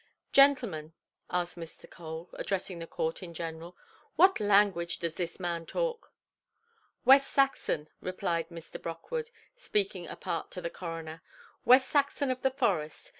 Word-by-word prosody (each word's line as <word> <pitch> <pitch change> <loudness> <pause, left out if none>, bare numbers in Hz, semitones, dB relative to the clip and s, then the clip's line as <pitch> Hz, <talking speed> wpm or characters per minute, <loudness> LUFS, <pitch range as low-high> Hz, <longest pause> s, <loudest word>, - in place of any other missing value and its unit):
"Gentlemen", 240 - +4 0.4
asked 180 0 -2
Mr. 165 -1 -9
Cole, 160 0 -8
addressing 185 -2 -3
the 165 - -6
court 160 +2 -2
in 170 -2 -8
general, 165 +1 -6 0.4
"what 380 +1 +6
language 200 -4 +3
does 170 -2 -2
this 175 +1 -4
man 170 -2 -3
talk"? - - -2 0.9
"West 270 +2 +7
Saxon", 270 - +1
replied 170 -3 -2
Mr. 165 -1 -9
Brockwood, 455 - -4 0.3
speaking 200 - -1
apart 165 - -4
to - - -4
the 170 -2 -4
coroner; 165 -2 -6 0.4
"West 255 +1 +7
Saxon 280 -1 +1
of 255 - -3
the 265 - +3
forest. 195 - -1
180 Hz, 135 wpm, -30 LUFS, 165-255 Hz, 0.9 s, West